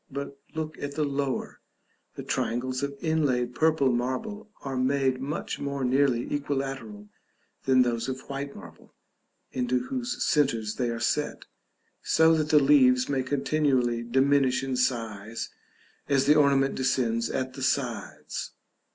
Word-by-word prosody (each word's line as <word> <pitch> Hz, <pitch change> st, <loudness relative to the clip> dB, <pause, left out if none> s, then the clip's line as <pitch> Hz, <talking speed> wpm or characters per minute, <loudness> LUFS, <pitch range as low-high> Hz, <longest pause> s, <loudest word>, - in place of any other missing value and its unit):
But 140 Hz, 0 st, -5 dB, 0.2 s
look 160 Hz, -1 st, -4 dB
at 145 Hz, 0 st, -4 dB
the 155 Hz, -, +1 dB
lower: 140 Hz, -2 st, -2 dB, 0.6 s
the -, -, -6 dB
triangles 130 Hz, +2 st, -1 dB
of 140 Hz, 0 st, -3 dB
inlaid 140 Hz, -7 st, +1 dB
purple 155 Hz, -3 st, +3 dB
marble 130 Hz, -, -3 dB
are 135 Hz, -1 st, -4 dB
made 130 Hz, 0 st, +1 dB
much 140 Hz, +3 st, -4 dB
more 140 Hz, -1 st, -3 dB
nearly 130 Hz, -1 st, +2 dB
equilateral 135 Hz, -7 st, -3 dB, 0.6 s
than 130 Hz, -1 st, +5 dB
those 120 Hz, 0 st, -1 dB
of 130 Hz, 0 st, -4 dB
white 140 Hz, 0 st, -5 dB
marble, -, -, -14 dB, 0.6 s
into 250 Hz, 0 st, 0 dB
whose 255 Hz, -2 st, -3 dB
centres 115 Hz, -8 st, +1 dB
they 125 Hz, -2 st, 0 dB
are 115 Hz, -1 st, -3 dB
set, -, -, -1 dB, 0.6 s
so 160 Hz, 0 st, +4 dB
that 155 Hz, -1 st, 0 dB
the 150 Hz, -, +6 dB
leaves 135 Hz, -3 st, +5 dB
may 135 Hz, -2 st, +1 dB
continually 130 Hz, -3 st, +1 dB
diminish 130 Hz, +1 st, +2 dB
in 135 Hz, -1 st, -2 dB
size 115 Hz, -4 st, -2 dB, 0.6 s
as 135 Hz, -1 st, +3 dB
the 145 Hz, -, +6 dB
ornament 140 Hz, -2 st, +3 dB
descends 120 Hz, -3 st, 0 dB
at 130 Hz, -1 st, -2 dB
the 135 Hz, -, -8 dB
sides. 120 Hz, -, -2 dB
135 Hz, 140 wpm, -27 LUFS, 125-145 Hz, 0.6 s, the